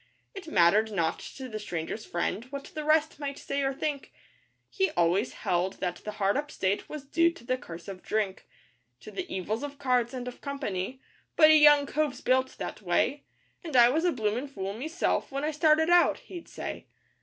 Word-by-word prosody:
It 390 -3 -9
mattered 205 - +4
not 170 -5 0 0.2
to 265 -2 -6
the 215 -3 -5
Stranger's 175 +2 -5
Friend 175 +5 -2
what 275 +1 -8
the 305 - -4
rest 310 0 +2
might 280 -1 -4
say 280 0 -3
or 270 0 +1
think, 280 +1 -3 0.6
He 385 -2 0
always 175 +7 +2
held 180 +2 0
that 180 -2 -3
the 210 - -7
hard 200 -1 +1
up 295 +1 -3
state 195 -4 -1
was 300 -2 -7
due 335 +4 +3
to 335 - -15
the 255 +2 0
curse 175 -9 -10
of 190 -2 -7
drink, 210 -3 -2 0.5
To - - -10
the 365 -3 -5
evils 210 +4 -2
of 285 -1 -6
cards, 250 -2 +1
and 250 -1 -5
of 250 - -8
company: 260 -4 -4 0.3
'But 310 -1 +7
a - - +8
young 295 -1 +7
cove's 290 -2 -1
built 260 +1 +1
that - - -6
way, 200 +10 0 0.4
And 320 -5 -6
I 240 -1 +8
was 315 +6 +1
a 355 - +3
bloomin' 230 +1 -1
fool 195 -7 -5
meself 310 - -1
when 275 +1 -3
I 305 - 0
started 315 +2 +3
out,' 350 0 +5
he'd 350 -3 -10
say. - - -6
260 Hz, 200 wpm, -28 LUFS, 205-300 Hz, 0.6 s, a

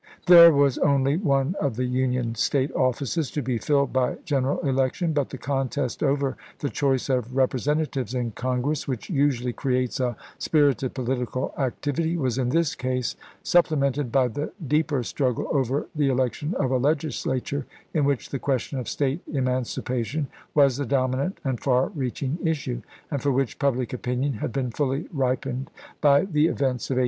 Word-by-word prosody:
There 170 -1 +10
was 140 -3 +3
only 140 0 +3
one 140 -4 +1
of 140 -6 0
the 125 +2 -1
Union 125 -2 0
State 135 +4 +1
offices 130 +3 0
to 150 - -3
be 120 -2 -1
filled 140 +2 +1
by 130 -1 +1
gen 140 -5 +1
eral 140 +4 -1
election; 135 +5 +1
but 145 -3 0
the 135 - -7
contest 135 -1 -2
over 140 -1 +1 0.2
the 145 - -3
choice 135 -3 +1
of 125 -2 -1
Rep 130 -1 +3
resentatives 140 -1 -1
in 120 -2 -1
Congress, 130 +5 -2
which 130 - -4
usually 135 -5 +1
creates 130 -1 -1
a 125 -3 -1 0.2
spirited 140 -5 +2
political 130 -1 -2
activity, 145 +5 -1
was 130 -5 -1
in 125 -2 +1
this 165 +2 +2
case 125 -1 -2 0.3
supple 175 -3 +3
mented 140 -2 0
by 130 -1 +3
the 145 +6 -4 0.2
deeper 150 -2 +1
struggle 125 0 -1
over 135 0 0
the 145 -3 +1
election 130 +5 -1
of 130 -2 0
a 130 - +3
Legislature, 140 -1 -1 0.3
in 155 - +2
which 140 -3 0
the 135 - -3
question 135 0 -1
of 125 - -5
State 140 +3 -1
eman 130 -3 +1
cipation 130 +4 -2 0.3
was 140 -4 +5
the 145 - -2
dominant 135 - 0
and 130 -5 -1
far 130 -1 +2
reaching 140 - -3
issue, 150 - -1 0.3
and 140 - -1
for 145 - +1
which 135 -1 -1
public 130 -4 0
opinion 125 +3 -1
had 115 +2 -4
been 125 0 -2
fully 135 +4 -1
ripened 130 -1 -1 0.3
by 145 -1 +6
the 155 -4 +2
events 130 -6 -1
of 135 - 0
1862. - - +4
135 Hz, 175 wpm, -25 LUFS, 125-145 Hz, 0.3 s, There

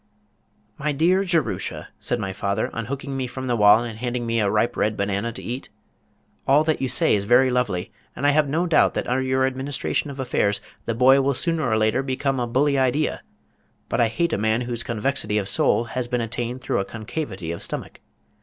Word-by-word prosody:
"My 150 +1 0
dear 180 +7 +3
Jerusha," 175 -4 -1
said 120 - -1
my 95 -2 -3
father, 100 +3 -1
unhooking 135 +4 -4
me 130 -1 -2
from 130 +2 -6
the 120 -2 0
wall 105 +1 +6
and 115 -2 -7
handing 120 0 -2
me 115 0 0
a 105 -2 +2
ripe 110 +4 +1
red 105 0 0
banana 100 +3 -1
to 120 - -9
eat, 125 +3 -5 0.8
"all 145 +3 +5
that 155 -2 0
you 130 - 0
say 120 - +3
is 100 -1 +1
very 125 +4 +5
lovely, 105 -8 -1 0.2
and 140 - -3
I 145 - +6
have 150 -1 +2
no 165 +5 +1
doubt 165 - +3
that - - -1
under 125 +1 +1
your 130 0 +1
administration 135 +3 -2
of 140 -1 -8
affairs 105 -5 0 0.3
the 115 - -1
boy 130 +3 +6
will 140 0 +1
sooner 160 -3 0
or 110 - +2
later 110 +3 +2
become 135 0 -1
a 120 - -1
bully 140 +3 +2
idea, 135 +4 +1 0.7
but - - +1
I 115 - +4
hate 165 +9 -1
a - - 0
man 110 +2 +1
whose 120 -1 -3
convexity 115 -1 -1
of 100 -2 -1
soul 115 - +2
has 120 +1 -4
been 125 0 -1
attained 120 +2 -3
through - - -1
a 95 - -1
concavity 105 - -5
of 85 - -6
stomach. - - -6
125 Hz, 210 wpm, -23 LUFS, 110-135 Hz, 0.8 s, wall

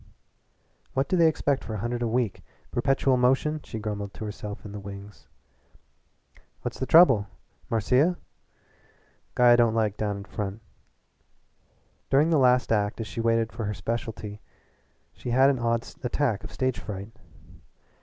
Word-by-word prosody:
"What 135 +1 +1
do - - +1
they 170 -2 +5
expect 145 -3 0
for 110 - -5
a - - -2
hundred 120 +3 -3
a 120 - +1
week 115 -2 -1 0.3
perpetual 135 +1 +2
motion?" 135 +5 +2
she - - -7
grumbled 105 -2 -5
to 110 - -6
herself 105 0 -7
in 105 - -7
the 105 - -6
wings. 100 +1 -10 1.4
"What's - - -5
the 130 - -2
trouble? 135 - +6 0.4
Marcia?" 130 - +2 1.2
"Guy 125 -1 +6
I - - +8
don't 115 -2 +3
like 105 -3 0
down 105 -2 -2
in 100 - -7
front." 100 +1 -5 1.5
During 145 +5 +4
the 155 - +4
last 125 -2 +3
act 105 -1 +1
as 115 - -3
she 110 +2 -5
waited 115 -1 +1
for 110 -1 -4
her 105 0 -3
specialty 110 -2 -5 0.7
she - - -7
had 130 +3 +5
an 130 - -2
odd 115 -1 0 0.2
attack 125 -4 0
of - - -8
stage 130 -1 -1
fright. 100 0 -7
115 Hz, 155 wpm, -26 LUFS, 105-130 Hz, 1.5 s, I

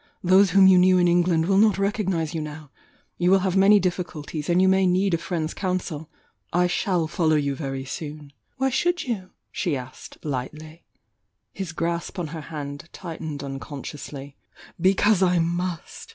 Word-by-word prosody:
Those 190 +2 +5
whom 195 +1 +6
you 190 -1 +7
knew 185 0 +5
in 175 -1 +4
Eng 175 +1 +4
land 165 -3 +2
will 195 +2 +3
not 215 -2 +4
recognise 190 -5 -1
you 160 - -2
now,— 150 -1 -8 0.5
you 175 0 +2
wUl 190 0 +5
have 185 -1 0
many 200 +2 +6
diflBculties, 170 -4 -4
and 175 +1 +3
you 190 - +4
may 190 0 +4
need 185 +1 +2
a - - +3
friend's 165 -2 -3
coun 185 -1 -1
sel— 155 -4 -7 0.4
I 180 +1 +3
shall 180 -1 0
follow 155 -1 +1
you 140 -2 0
very 135 -2 -5
soon!" 145 0 -7 0.2
"Why 265 +1 +1
should 350 +6 +1
you?" 200 -7 -4 0.2
she 160 -6 -1
asked, 130 0 -10
lightly. 155 +4 -6 0.7
His 190 -4 -5
grasp 170 +3 -3
on 170 -4 -3
her 160 0 -6
hand 150 0 -7
tightened 160 -5 -6
unconsciously. 140 0 -7 0.5
"Because 195 +2 +3
I 180 -1 +3
must!" 175 - -3
175 Hz, 175 wpm, -24 LUFS, 155-190 Hz, 0.7 s, you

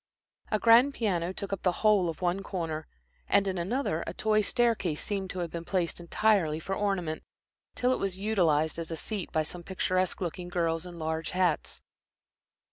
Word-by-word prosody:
A 215 - +2
grand 240 +6 +6
piano 180 -6 0
took 200 +1 -5
up 195 - -3
the 180 - +3
whole 200 -5 +5
of 165 +2 -6
one 180 +2 +1
corner, 165 -5 -4 0.4
and 200 0 +4
in 190 -2 -1
another 180 - -1
a - - -5
toy 215 0 +2
staircase 210 -8 +1
seemed 195 -2 -3
to 185 - -6
have 165 - -10
been 170 -1 -5
placed 175 -1 -1
entirely 175 -3 +2
for 190 +4 -4
ornament, 195 -6 -1 0.5
till 250 +1 +2
it - - -2
was 195 -2 -2
utilized 170 -7 +1
as 165 - -4
a 165 - -3
seat 205 +2 -4
by 160 -1 +1
some 175 +3 -7
picturesque 185 0 0
looking 175 -1 -4
girls 170 -1 -1
in 175 -1 -9
large 160 0 -2
hats. 180 -5 0
180 Hz, 185 wpm, -29 LUFS, 165-200 Hz, 0.5 s, grand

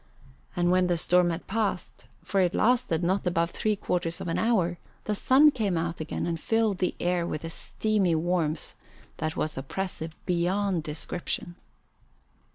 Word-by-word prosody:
And 175 0 +2
when 185 0 +3
the 175 -1 +1
storm 180 +1 +3
had 170 +1 -4
passed, 205 -3 -2 0.2
for 195 - +1
it 180 0 +1
lasted 215 -8 +2
not 185 +2 +1
above 170 -1 +1
three 215 -1 0
quarters 170 -3 -2
of - - -5
an 165 - 0
hour, 185 -7 +1 0.2
the 210 - -1
sun 270 +8 +5
came 210 -9 0
out 165 +1 -2
again 155 - -3
and 165 -1 -2
filled 220 0 +1
the 180 - 0
air 175 -1 0
with 155 - -4
a 165 - -4
steamy 200 -2 0
warmth 165 -2 -1 0.4
that 155 0 -3
was 155 -3 -1
oppressive 160 +2 -4
beyond 180 +1 +1
description. 165 +3 -3
175 Hz, 165 wpm, -27 LUFS, 165-200 Hz, 0.4 s, sun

